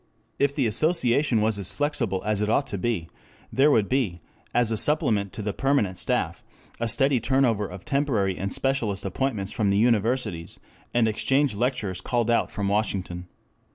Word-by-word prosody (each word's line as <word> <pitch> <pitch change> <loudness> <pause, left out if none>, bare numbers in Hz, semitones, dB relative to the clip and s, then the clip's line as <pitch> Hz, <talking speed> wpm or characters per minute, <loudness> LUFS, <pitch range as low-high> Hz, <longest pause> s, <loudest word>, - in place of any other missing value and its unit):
If 140 0 +2
the 135 - +1
association 125 -1 +2
was 110 -1 +1
as 100 0 -1
flexible 115 -5 -1
as 105 -1 0
it 105 - 0
ought 135 +5 +2
to 100 - -5
be, 100 -6 -1 0.5
there 140 +3 +4
would 110 -8 +3
be, 120 -10 0 0.3
as 120 -1 +2
a - - +1
supplement 105 -7 +2
to 110 - -5
the 105 0 -2
permanent 135 -9 +1
staff, - - -2 0.4
a 115 0 -1
steady 135 +2 +2
turnover 115 -5 +1
of 90 0 -10
temporary 120 -10 0
and 95 +2 -4
specialist 115 -7 -1
appointments 100 -1 -2
from 105 -3 0
the 100 - +2
universities, 110 -6 0 0.3
and 120 -2 +2
exchange 135 +5 +1
lecturers 105 -5 -2
called 120 0 0
out 115 - +2
from 100 -2 -3
Washington. 95 -4 -2
110 Hz, 170 wpm, -25 LUFS, 100-135 Hz, 0.5 s, there